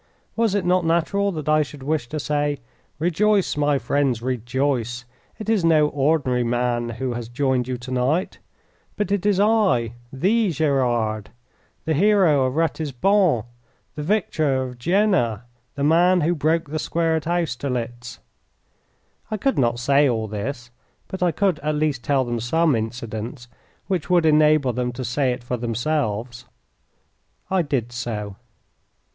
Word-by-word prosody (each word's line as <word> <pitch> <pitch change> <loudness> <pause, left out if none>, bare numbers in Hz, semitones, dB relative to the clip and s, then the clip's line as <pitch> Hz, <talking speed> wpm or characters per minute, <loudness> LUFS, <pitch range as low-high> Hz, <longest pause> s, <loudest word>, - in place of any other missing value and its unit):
Was 225 -3 +1
it 200 - 0
not 180 0 +2
natural 170 +5 +1
that 155 -3 -6
I 155 0 +4
should 145 -2 -6
wish 145 -4 -1
to 155 - -3
say, 145 0 -1 0.4
"Rejoice, 190 +5 +1
my 145 -1 +2
friends, 135 -1 0
rejoice! 125 0 -2 0.3
It 215 - -8
is 220 -5 +2
no 155 -3 +4
ordinary 135 -4 +1
man 120 0 0
who 130 -2 -2
has 120 -1 -6
joined 130 -1 0
you 130 -1 -3
to 125 +2 -9
night, 135 +9 0 0.6
but 210 -1 -2
it 205 0 +1
is 200 -2 +2
I, 200 - +2 0.2
THE 205 - +1
Gerard, 120 - 0 0.6
the 160 - +1
hero 175 -5 +4
of 130 - -4
Ratisbon, 160 - +1 0.5
the 150 - -6
victor 155 -7 0
of 125 -1 -8
Jena, 170 - +1 0.3
the 140 - -3
man 175 +4 +4
who 165 +3 +2
broke 160 -1 0
the 155 - -2
square 165 +1 0
at 160 -1 -3
Austerlitz"? 125 -7 -3 1.1
I 215 - -2
could 270 - 0
not 120 -2 +2
say 140 +3 +3
all 110 -2 -1
this. 120 +4 -5 0.4
But 190 - -6
I 180 -1 +3
could 185 0 0
at 150 +1 -1
least 150 -5 -1
tell 135 -1 +1
them 120 -1 -2
some 155 +5 +2
incidents 115 +2 -5 0.4
which 185 -4 -2
would 175 -2 +3
enable 150 -4 +4
them 125 0 -2
to 130 +1 -5
say 125 +2 0
it 125 0 -5
for 125 0 -3
themselves. 120 -1 -2 1.1
I 190 -1 +3
did 135 -7 -2
so. 110 -4 -5
145 Hz, 150 wpm, -22 LUFS, 120-165 Hz, 1.1 s, I